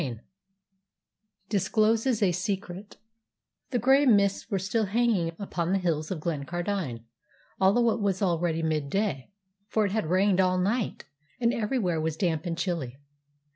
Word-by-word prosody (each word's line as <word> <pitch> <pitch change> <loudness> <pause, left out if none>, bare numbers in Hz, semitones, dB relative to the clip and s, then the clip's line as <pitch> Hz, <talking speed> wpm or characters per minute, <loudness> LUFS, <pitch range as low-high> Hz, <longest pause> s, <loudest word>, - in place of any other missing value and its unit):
CHAPTER 125 -7 -4
XXXV 110 - -20 1.3
DISCLOSES 220 +3 +2
A 185 - +4
SECRET 190 +1 -4 0.7
The 250 - 0
grey 270 +4 +4
mists 200 -2 +3
were 200 - 0
still 205 +4 0
hanging 200 -5 +1
upon 180 -3 -2
the - - +3
hills 160 -4 -1
of 185 - -3
Glencardine, 170 - -3 0.6
although 225 +5 +4
it 220 - -2
was 195 -2 0
already 170 -3 0
midday, 155 0 -1 0.4
for 215 0 +1
it 200 - -1
had 215 -6 -1
rained 190 +1 +3
all 185 0 +2
night, 205 +5 -1 0.3
and 235 -1 +2
everywhere 210 -8 0
was 160 0 -2
damp 170 -2 -1
and 165 -1 -3
chilly. 165 -8 -3
190 Hz, 145 wpm, -27 LUFS, 165-215 Hz, 1.3 s, A